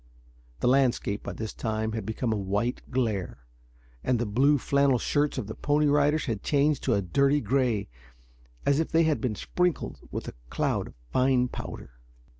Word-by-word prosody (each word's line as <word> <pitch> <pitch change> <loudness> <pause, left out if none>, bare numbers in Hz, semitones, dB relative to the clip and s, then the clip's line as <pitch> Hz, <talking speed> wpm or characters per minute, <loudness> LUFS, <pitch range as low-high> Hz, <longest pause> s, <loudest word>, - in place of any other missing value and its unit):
The - - +2
landscape, 125 -6 +2
by - - -6
this 110 -1 -5
time, 110 0 -2
had 110 -2 -4
become 110 +1 -1
a - - 0
white 105 +5 -1
glare, 105 - -2 0.6
and 125 - +2
the 120 - -1
blue 135 +8 +3
flannel 140 -1 +2
shirts 145 +4 0
of 130 - -2
the 110 - -6
Pony 150 +4 +1
Riders 145 +1 +3
had 115 -7 -2
changed 145 0 +2
to 120 - +3
a 100 - 0
dirty 140 +9 +2
gray 120 -3 0 0.8
as 140 +1 +3
if 160 - -1
they 165 +1 +4
had 155 -2 +1
been 125 -5 -1
sprinkled 180 - -1
with - - -5
a - - -6 0.2
cloud - - -1
of - - -14 0.2
fine 130 -1 +3
powder. - - -8
125 Hz, 180 wpm, -27 LUFS, 110-140 Hz, 0.8 s, they